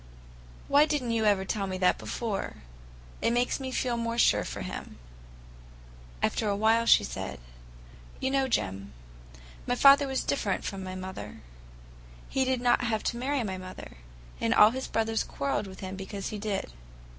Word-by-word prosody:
"Why 290 +2 +5
did 295 -3 0
n't 235 - -2
you 225 -1 +1
ever 200 -2 +3
tell 200 0 -2
me 185 -1 -3
that 185 -1 +2
before? 215 - -4 0.6
It - - +2
makes 245 +3 +1
me 260 -1 -4
feel 245 -2 -1
more 230 0 -2
sure - - +4
for - - -6
him." - - -7 1.3
After 215 - +1
a 200 - +1
while 225 +2 +3
she - - +7
said: - - -5 0.8
"You 265 - -1
know, 270 -1 +2
Jim, 100 - -2 0.7
my 245 - +1
father 275 +2 +7
was 265 -1 -1
different 205 -8 -1
from 195 -1 -4
my 185 0 -6
mother. 185 0 -7 0.9
He 265 - 0
did 260 -1 0
not 245 0 +3
have 220 -2 -1
to - - -7
marry 265 +1 -1
my 190 -3 -4
mother, 185 - -10 0.4
and 230 0 +1
all 210 +1 +8
his 260 +2 -4
brothers 225 0 0
quarreled 140 +8 -2
with 190 0 -11
him 190 0 -5
because 195 +1 -5
he 210 - -5
did. 200 - -3
225 Hz, 175 wpm, -28 LUFS, 190-250 Hz, 1.3 s, all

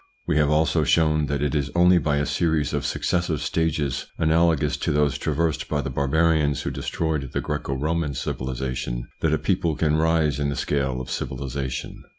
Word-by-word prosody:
We - - +1
have 75 -1 +3
also 80 +1 +2
shown 75 -1 +2
that 70 0 -1
it 75 - 0
is 75 -1 0
only 90 +1 +5
by 75 -2 0
a 75 - +1
series 80 -3 0
of - - -1
successive 85 -3 -1
stages, 75 -2 -1
analogous 80 -1 +2
to - - -1
those 75 -2 +2
traversed 80 +2 -1
by 75 -1 0
the 65 - -4
barbarians 75 +2 +2
who - - -2
destroyed 75 -5 -2
the - - 0
Greco 70 - -3
Roman 75 +1 -1
civilisation, 65 -2 -3
that 80 - +1
a 80 - +3
people 85 -2 0
can 75 0 +1
rise 80 -3 +2
in 70 -1 0
the 70 - -2
scale 65 -3 -1
of 65 - -7
civilisation. 65 0 -4
75 Hz, 180 wpm, -24 LUFS, 70-80 Hz, -, only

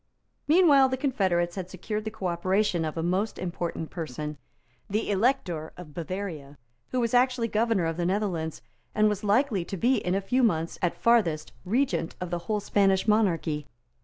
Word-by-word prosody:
Meanwhile 295 -5 +6
the 260 - -1
confederates 190 -11 0
had 185 -2 -5
secured 210 +4 -4
the - - -1
cooperation 185 -1 0
of 155 +1 -4
a 165 - -1
most 190 +5 0
important 170 -2 -4
person, 150 -2 -5 0.5
the 210 +1 -1
Elector 190 - 0
of 170 -4 -10
Bavaria, 165 -5 -5 0.3
who 255 - -1
was 235 -1 0
actually 250 -1 +3
Governor 220 -4 +1
of 165 0 -2
the 175 - -1
Netherlands, 180 -5 -2 0.3
and 215 0 +4
was 210 0 -1
likely 210 -1 +2
to 195 - -5
be 245 +7 +3
in 180 -3 -1
a - - +2
few 245 +7 0
months, 165 -8 +1
at 175 - 0
farthest, 175 -10 +2
Regent 240 -5 0
of 180 -1 -5
the 175 - -1
whole 210 -1 +1
Spanish 195 -1 +2
monarchy. 165 -8 +1
190 Hz, 170 wpm, -27 LUFS, 170-225 Hz, 0.5 s, Meanwhile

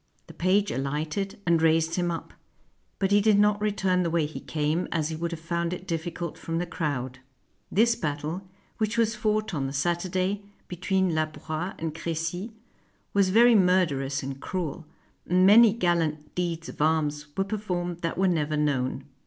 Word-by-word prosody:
The - - -13
page 195 +3 +2
alighted, 155 +10 -3
and 170 -2 +3
raised 160 0 +3
him 175 0 0
up; 165 -1 -5 0.6
but 195 0 0
he 205 0 +5
did 210 -1 +4
not 205 0 +3
return 195 -3 +1
the 170 - 0
way 165 -2 +1
he 150 - -6
came, 155 +3 -1
as 155 -2 0
he 160 - -3
would 170 +2 -2
have 165 -1 -6
found 170 +1 -2
it 180 - -7
difficult 170 -1 -4
from 165 0 -3
the 175 - -1
crowd. 130 -7 -3 0.5
This 230 +3 +4
battle, 155 +4 -4 0.3
which 220 +1 0
was 225 -1 +3
fought 215 -1 -1
on 140 -4 -1
the 135 - -5
Saturday 185 +6 0 0.3
between 185 0 0
La 155 0 +1
Broyes 155 +4 -5
and 160 -1 -3
Crecy, 165 +6 -3 0.6
was 200 -2 +3
very 235 +5 +6
murderous 170 -9 +2
and 135 0 -6
cruel; 165 -4 -4 0.4
and 180 +1 +4
many 220 +3 +8
gallant 165 -7 0
deeds 170 -2 -2
of - - -7
arms 150 -1 +1
were 195 - +3
performed 180 -4 -3
that 165 -1 -2
were 190 +1 +3
never 155 -4 0
known. 135 -3 0
170 Hz, 175 wpm, -27 LUFS, 155-190 Hz, 0.6 s, many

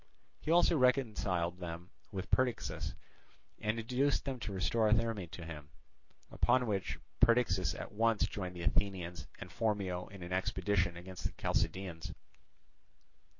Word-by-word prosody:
He - - -6
also 170 -2 +5
reconciled 105 -9 +2
them 85 0 -6 0.2
with 95 -2 -5
Perdiccas, 130 -2 0 0.6
and 110 +1 0
induced 130 +6 +1
them 135 -3 -3
to 110 - -4
restore 105 +3 +2
Therme 110 -5 +1
to 85 0 -8
him; 75 -3 -8 0.6
upon 130 -1 +3
which 100 -4 -1 0.2
Perdiccas 95 -7 +4
at - - -6
once 115 0 +3
joined 90 -3 -5
the 85 - -5
Athenians 90 -1 -1
and 90 - -8
Phormio 95 -3 -1
in 95 -2 -9
an 90 +1 -4
expedition 95 -1 +1
against 90 +1 -8
the - - -1
Chalcidians. 90 -4 -2
95 Hz, 135 wpm, -34 LUFS, 90-115 Hz, 0.6 s, also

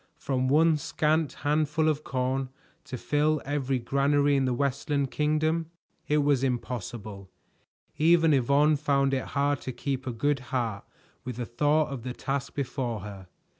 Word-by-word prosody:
From 130 -2 -1
one 155 +3 +4
scant 155 0 0
handful 150 +1 +1
of 150 -1 0
corn 130 0 -1 0.4
to 130 - -6
fill 150 +3 +1
every 135 -2 -1
granary 140 +3 +2
in 135 -1 +2
the 130 - +1
Westland 140 +1 -1
Kingdom! 155 +2 0 0.4
It 150 0 +2
was 140 -2 +2
impossible. 110 -5 -4 0.7
Even 165 0 +5
Yvonne 140 +3 +3
found 140 -2 +1
it 130 - -1
hard 140 0 +1
to 130 - -4
keep 130 +1 -4
a - - -1
good 135 +5 0
heart 115 -6 -2 0.4
with 125 -2 -5
the 120 0 -4
thought 150 +6 +1
of 135 -3 -5
the 125 +1 -5
task 140 +2 -4
before 125 -5 -3
her. 100 -2 -9
140 Hz, 155 wpm, -27 LUFS, 125-150 Hz, 0.7 s, Even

